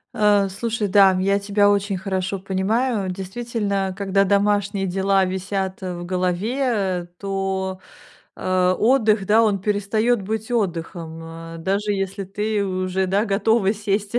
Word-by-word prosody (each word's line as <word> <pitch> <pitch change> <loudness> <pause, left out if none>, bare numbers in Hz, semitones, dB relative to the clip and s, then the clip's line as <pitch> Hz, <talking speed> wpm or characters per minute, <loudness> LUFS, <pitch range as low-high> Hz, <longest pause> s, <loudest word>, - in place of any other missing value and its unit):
Э, 205 -2 +4
слушай, 215 +2 -2
да, 195 0 +6
я 195 +2 +2
тебя 205 0 +2
очень 200 -1 0
хорошо 190 0 -2
понимаю, 200 +2 0
действительно, 200 0 -3
когда 195 -1 +2
домашние 200 0 +1
дела 195 +1 +2
висят 190 +1 -3
в 175 -2 -5
голове, 190 +1 -1
то, 190 -1 -2 0.6
э, 185 0 +1
отдых, 220 -4 +3
да, 215 +3 +5
он 205 -3 +1
перестает 210 +3 +1
быть 220 +4 -4
отдыхом, 170 -6 -3 0.3
э, - - -8
даже 200 +4 0
если 195 0 -3
ты 205 +2 -1
уже, 185 0 -1
да, 200 +4 +1
готова 205 0 +2
сесть 205 +1 -2
195 Hz, 130 wpm, -22 LUFS, 190-210 Hz, 0.6 s, да